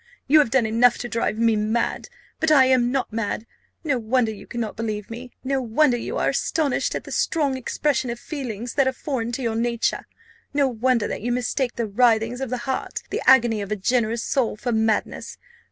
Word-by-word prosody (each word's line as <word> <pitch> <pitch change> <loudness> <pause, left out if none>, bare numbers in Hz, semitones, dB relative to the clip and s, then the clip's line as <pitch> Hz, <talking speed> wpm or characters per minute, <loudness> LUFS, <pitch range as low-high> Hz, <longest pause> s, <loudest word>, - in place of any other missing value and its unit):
You 305 +3 +6
have 290 - +3
done 255 -1 +2
enough 230 +2 +4
to 245 - -5
drive 230 -2 -1
me 230 -1 +3
mad 215 - -1 0.3
but 320 - +1
I 280 -4 +6
am 255 -2 +3
not 265 -4 -2
mad. 220 0 -2 0.4
No 280 -6 0
wonder 230 0 +1
you 200 -1 -12
cannot 230 -3 -4
believe 215 -1 -4
me 245 +2 -7
no 270 0 0
wonder 250 +3 +2
you 240 - -4
are - - +1
astonished 300 -5 0
at - - -3
the - - -10
strong 290 -5 0
expression 260 0 -1
of 235 0 -4
feelings 245 -6 -5
that 275 -2 +2
are 260 - +1
foreign 250 -5 -3
to 260 - -3
your 230 -2 -1
nature 235 0 -1 0.5
no 285 -1 +3
wonder 245 -1 +1
that - - -4
you 240 +3 -2
mistake 250 +1 -1
the 235 - -1
writhings 230 +2 +2
of 265 - -3
the 240 -1 -4
heart, 265 - -3
the - - -2
agony 240 -5 +5
of 200 0 -6
a - - +1
generous 230 +2 0
soul, 245 -6 0
for 245 +3 -3
madness! 220 -1 -1
240 Hz, 205 wpm, -23 LUFS, 225-260 Hz, 0.5 s, You